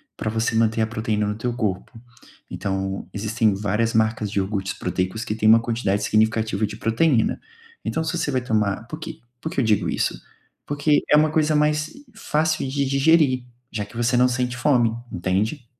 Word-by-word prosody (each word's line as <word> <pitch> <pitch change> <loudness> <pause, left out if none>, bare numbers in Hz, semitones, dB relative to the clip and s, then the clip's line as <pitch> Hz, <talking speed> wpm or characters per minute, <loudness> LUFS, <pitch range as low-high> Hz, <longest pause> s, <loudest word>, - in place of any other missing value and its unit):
para 110 - -3
você 115 +1 -1
manter 115 0 +2
a 110 - +2
proteína 110 -1 -1
no 105 0 -2
teu 120 +3 -2
corpo, 105 0 -3 0.5
então 95 0 -3
existem 110 0 0
várias 105 +3 0
marcas 110 -1 +1
de 100 - -5
iogurtes 95 0 -1
proteicos 95 +5 -3
que - - -2
têm 110 0 +2
uma 115 - +8
quantidade 115 -4 -1
significativa 110 -1 +1
de - - -8
proteína, 115 +1 +1 0.4
então 160 - -1
se 165 +2 -2
você 160 - -1
vai 130 -2 0
tomar 110 -3 0
por 155 - -7
que 160 0 -8 0.2
por 160 - -3
que - - -2
eu - - +3
digo 105 -6 +2
isso? - - -1 0.5
Porque 145 +1 +2
é 150 - +7
uma 155 0 +3
coisa 155 -1 +2
mais 150 +1 +1 0.2
fácil 160 -8 0
de 140 +1 -1
digerir, 135 -2 +3 0.3
já 105 - -3
que 105 +3 -12
você 120 +1 +1
não 125 +1 +5
sente 125 0 -1
fome, 120 -3 +2 0.2
entende? 100 - -1
115 Hz, 185 wpm, -23 LUFS, 105-140 Hz, 0.5 s, uma